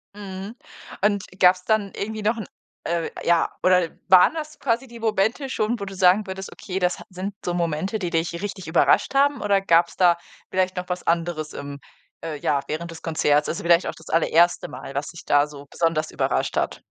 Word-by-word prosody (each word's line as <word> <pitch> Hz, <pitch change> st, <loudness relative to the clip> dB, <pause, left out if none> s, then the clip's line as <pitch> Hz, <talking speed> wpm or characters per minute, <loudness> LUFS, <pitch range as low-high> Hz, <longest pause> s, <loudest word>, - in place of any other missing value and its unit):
Mhm, 200 Hz, +2 st, -7 dB, 0.5 s
und 205 Hz, -2 st, +2 dB, 0.2 s
gab's 180 Hz, 0 st, +5 dB
dann 210 Hz, -1 st, +1 dB
irgendwie 215 Hz, +1 st, -4 dB
noch 220 Hz, +3 st, +1 dB
'n, 220 Hz, -, -5 dB, 0.4 s
äh 170 Hz, -1 st, -1 dB
ja 170 Hz, -1 st, +3 dB
oder 180 Hz, -2 st, +4 dB, 0.2 s
waren 185 Hz, -, +7 dB
das 310 Hz, -1 st, -6 dB
quasi 250 Hz, +1 st, 0 dB
die 235 Hz, -1 st, -11 dB
Momente 225 Hz, +5 st, 0 dB
schon, 225 Hz, 0 st, -1 dB
wo 200 Hz, -, -4 dB
du 195 Hz, 0 st, -8 dB
sagen 185 Hz, +3 st, +4 dB
würdest: 190 Hz, 0 st, -6 dB
„Okay, 190 Hz, -3 st, -5 dB
das 180 Hz, -1 st, 0 dB
ha -, -, -10 dB
sind 190 Hz, +2 st, -5 dB
so 175 Hz, -, -1 dB
Momente, 175 Hz, +4 st, -1 dB
die 180 Hz, -, -2 dB
dich 165 Hz, 0 st, -1 dB
richtig 200 Hz, -4 st, -5 dB
überrascht 165 Hz, +10 st, +3 dB
haben“ 285 Hz, +1 st, +3 dB
oder 200 Hz, -1 st, +2 dB
gab's 170 Hz, -2 st, +3 dB
da 175 Hz, -2 st, +4 dB, 0.3 s
vielleicht 185 Hz, 0 st, 0 dB
noch 180 Hz, 0 st, -5 dB
was 180 Hz, 0 st, -3 dB
anderes 165 Hz, -2 st, -1 dB
im 140 Hz, 0 st, -7 dB, 0.4 s
äh, 160 Hz, -2 st, -4 dB
ja, 145 Hz, 0 st, +1 dB
während 170 Hz, +2 st, -4 dB
des 165 Hz, -, -10 dB
Konzerts? 150 Hz, -2 st, +1 dB
Also 165 Hz, -, -3 dB
vielleicht 170 Hz, +1 st, +4 dB
auch -, -, -4 dB
das 160 Hz, -, -14 dB
allererste 170 Hz, +1 st, +3 dB
Mal, 135 Hz, -, -9 dB
was 140 Hz, +1 st, -2 dB
dich 170 Hz, -, -10 dB
da 145 Hz, 0 st, +3 dB
so 145 Hz, -1 st, -11 dB
besonders 165 Hz, -2 st, 0 dB
überrascht -, -, -1 dB
hat? -, -, -1 dB
180 Hz, 200 wpm, -23 LUFS, 165-205 Hz, 0.5 s, waren